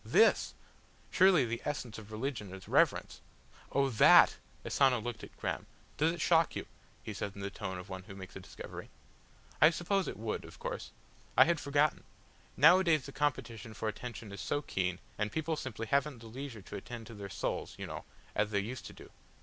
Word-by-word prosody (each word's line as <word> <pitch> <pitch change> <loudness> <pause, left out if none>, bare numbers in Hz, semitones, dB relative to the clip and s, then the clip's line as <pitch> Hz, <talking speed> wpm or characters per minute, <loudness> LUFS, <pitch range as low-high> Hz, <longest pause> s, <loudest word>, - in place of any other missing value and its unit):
"This! - - +4 0.6
Surely 185 -7 +6
the 115 0 -3
essence 125 -7 -4
of 110 0 -12
religion 110 -3 -3
is 95 0 -10
reverence." - - +2 0.5
"Oh 140 0 +3
that!" 115 - +7 0.3
Asano 130 -3 +3
looked 120 0 -5
at - - -11
Graham. - - -3 0.3
"Does 160 +2 +3
it 170 - -6
shock 165 0 +3
you?" - - -3 0.4
he - - -5
said 100 - -4
in 100 - -7
the 100 0 -3
tone 95 -3 -5
of 90 +1 -8
one 95 -1 -6
who 100 -2 -10
makes 95 -1 -10
a - - -5
discovery. 90 - -9 0.7
"I 155 - +9
suppose 185 +3 0
it - - -4
would, - - -3
of - - -12
course. 485 0 -5 0.5
I - - +9
had 170 -2 +2
forgotten. 145 +2 +2 0.5
Nowadays 165 0 +6
the 140 - -7
competition 120 -6 -2
for 110 - -3
attention 115 0 -6
is 100 - -6
so 145 - -1
keen, 90 -6 -1 0.2
and 105 0 0
people 160 +3 -1
simply 120 -6 -5
haven't 140 +3 +1
the 115 - -13
leisure 120 -2 -7
to - - -8
attend 115 +3 -8
to 115 - -10
their 100 -2 -7
souls, 95 - -3
you - - -5
know, - - -6 0.3
as 105 0 +1
they 100 -1 +1
used 120 +6 -5
to - - -10
do." - - -14
120 Hz, 200 wpm, -33 LUFS, 105-150 Hz, 0.7 s, I